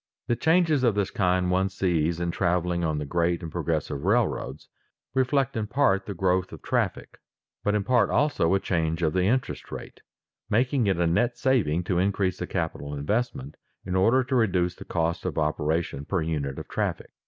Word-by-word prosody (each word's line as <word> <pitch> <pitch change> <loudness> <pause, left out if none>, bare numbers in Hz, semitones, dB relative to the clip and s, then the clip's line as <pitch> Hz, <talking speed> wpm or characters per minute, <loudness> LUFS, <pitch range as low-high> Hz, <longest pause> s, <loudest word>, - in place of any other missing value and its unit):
The 120 - +1
changes 160 -1 +3
of 115 -5 +3
this 100 -1 0
kind 90 -2 +1
one 95 +1 +2
sees 85 -3 0
in 85 0 -1
traveling 85 0 0
on 80 -2 0
the 75 - -3
great 85 +3 0
and 80 - -6
progressive 80 -4 -2
railroads, 115 +5 0 0.5
reflect 135 +1 +1
in 110 -2 -2
part 110 -6 +2
the 100 - -4
growth 95 +1 +1
of - - -11
traffic, - - -2 0.4
but 105 0 +1
in 105 - +1
part 125 +3 +3
also 120 - +2
a - - +2
change 80 -2 -1
of 80 -1 +1
the 90 0 +2
interest 125 +6 -1
rate, - - -8 0.5
making 125 +1 +2
it 95 -3 +2
a 85 - +2
net 120 +9 +1
saving 110 - +1
to 90 0 0
increase 95 -1 0
the - - -3
capital 70 0 -3
investment 75 - -2 0.3
in 90 0 -2
order 115 +8 +4
to 130 +1 -2
reduce 90 -7 +2
the - - -12
cost 85 0 -1
of - - -3
operation 75 -1 -1
per 95 - -1
unit 70 -4 -2
of - - -7
traffic. - - -3
95 Hz, 190 wpm, -26 LUFS, 85-115 Hz, 0.5 s, order